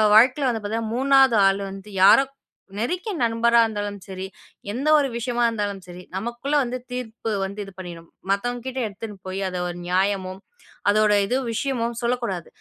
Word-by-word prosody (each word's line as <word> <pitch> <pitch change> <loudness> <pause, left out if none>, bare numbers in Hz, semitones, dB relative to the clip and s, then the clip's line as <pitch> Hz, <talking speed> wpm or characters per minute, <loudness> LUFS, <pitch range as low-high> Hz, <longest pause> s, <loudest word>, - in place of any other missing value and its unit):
வாழ்க்கையில 255 +5 +5
வந்து 225 -3 -2
பார்த்தீங்கன்னா 220 +1 -2
3வது 265 -3 +5
ஆள் 195 +1 +1
வந்து 195 +2 -10
யாரோ 270 +7 +8 0.5
நெருங்கிய 360 - -2
நண்பரா 235 +1 +3
இருந்தாலும் 205 -2 -4
சரி, 190 -1 -6 0.5
எந்த 265 +7 -3
ஒரு 285 -2 +2
விஷயமா 240 0 -1
இருந்தாலும் 205 -4 -3
சரி 180 +1 -10
நமக்குள்ள 240 +8 -2
வந்து 250 +1 -3
தீர்ப்பு 230 -2 -4
வந்து 200 +2 -7
இது 195 - -12
பண்ணிரும். 170 -2 -9 0.2
மத்தவங்ககிட்ட 245 +5 -2
எடுத்துனு 205 0 -8
போய் 190 +1 -3
அது 180 -1 -4
ஒரு 175 - -6
நியாயமும் 190 0 0 0.5
அதோட 210 0 +4
இதுவும் 250 +5 -1
விஷயமும் 235 -1 -1
சொல்லக் 245 +1 0
கூடாது. 185 -8 -3
225 Hz, 155 wpm, -23 LUFS, 195-245 Hz, 0.5 s, யாரோ